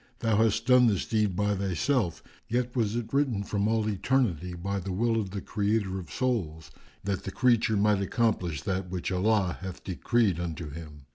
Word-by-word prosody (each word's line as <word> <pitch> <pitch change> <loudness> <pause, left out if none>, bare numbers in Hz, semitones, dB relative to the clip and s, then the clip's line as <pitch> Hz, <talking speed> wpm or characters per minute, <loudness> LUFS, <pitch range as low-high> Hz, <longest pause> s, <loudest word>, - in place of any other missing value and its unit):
Thou 115 -3 +1
hast 110 +1 +2
done 125 -1 +6
this 100 -5 +1
deed 105 -4 +1
by 105 +2 +1
thyself, 100 - 0 0.2
yet 125 +1 -1
was 110 -3 +1
it 120 0 -4
written 135 -8 +1
from 100 0 -1
all 110 -1 +1
eternity 100 - 0
by 100 +3 -3
the 95 +1 -5
will 115 +4 +1
of 100 - -5
the 100 0 -5
Creator 100 -2 -1
of 85 -4 -10
Souls, 100 -12 -2 0.3
that 100 -1 -2
the 95 - -5
creature 115 -2 +2
might 105 -1 +3
accomplish 95 - 0
that 95 -1 -2
which 90 0 -3
Allah 95 -1 +1
hath 95 -2 -7
decreed 100 0 +1
unto 85 -3 -4
him. 75 -2 -10
100 Hz, 185 wpm, -28 LUFS, 90-115 Hz, 0.3 s, done